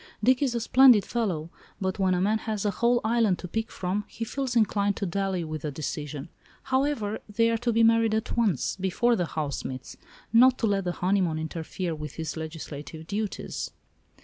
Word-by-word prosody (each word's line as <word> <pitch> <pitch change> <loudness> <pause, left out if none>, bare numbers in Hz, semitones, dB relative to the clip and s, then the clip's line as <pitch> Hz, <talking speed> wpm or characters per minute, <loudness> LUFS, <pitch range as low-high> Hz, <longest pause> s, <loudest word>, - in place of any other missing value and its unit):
Dick 255 +3 +4
is 260 -4 +1
a - - +1
splendid 245 -2 +6
fellow, 175 -9 -2 0.3
but 190 0 -2
when 185 -1 +3
a - - 0
man 215 +3 +2
has 215 -2 -3
a 205 - +2
whole 240 +3 +2
island 220 -4 +2
to 180 - -7
pick 225 +6 -3
from 190 +3 -2
he 230 - -5
feels 265 +1 -3
inclined 205 -3 +2
to 200 - -2
dally 190 0 -1
with 155 -2 -5
a 150 - -1
decision. 145 0 -5 0.4
However, 260 -5 0
they 230 +2 +2
are 230 - +1
to 240 +1 0
be 230 0 +3
married 225 -1 +4
at 220 - -2
once—before 215 +1 +1
the 175 -5 -1
House 150 -3 -3
meets—not 230 - +1
to - - 0
let 200 -3 +1
the 175 - 0
honeymoon 180 -3 +1
interfere 165 +2 -4
with 150 -2 -6
his 160 -2 -4
legislative 160 -1 -7
duties." 205 +3 -3
200 Hz, 185 wpm, -27 LUFS, 165-230 Hz, 0.4 s, splendid